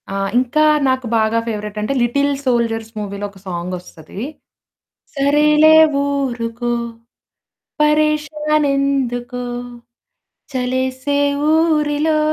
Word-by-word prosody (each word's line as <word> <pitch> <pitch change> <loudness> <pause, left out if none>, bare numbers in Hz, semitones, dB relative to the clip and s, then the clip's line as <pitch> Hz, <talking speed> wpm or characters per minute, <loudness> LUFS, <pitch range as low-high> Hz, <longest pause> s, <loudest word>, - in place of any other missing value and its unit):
ఆ! - - -5 0.2
ఇంకా 255 +4 +1 0.3
నాకు 260 -1 0
బాగా 220 +1 +2
ఫేవరైట్ 210 -1 -4
అంటే 215 +6 -1
'లిటిల్ 280 +4 +1
సోల్జర్స్' 230 -2 0
మూవీలో 200 0 -5
ఒక 195 - -17
సాంగొస్తది. 180 0 -7 0.9
సరేలే 300 +2 +4 0.3
ఊరుకో, 240 -4 -2 1.1
పరేషానెందుకొ 295 -4 +1 1.2
చలేసే 260 +2 -1 0.4
ఊరిలో 310 -1 +2
260 Hz, 80 wpm, -18 LUFS, 230-295 Hz, 1.2 s, సరేలే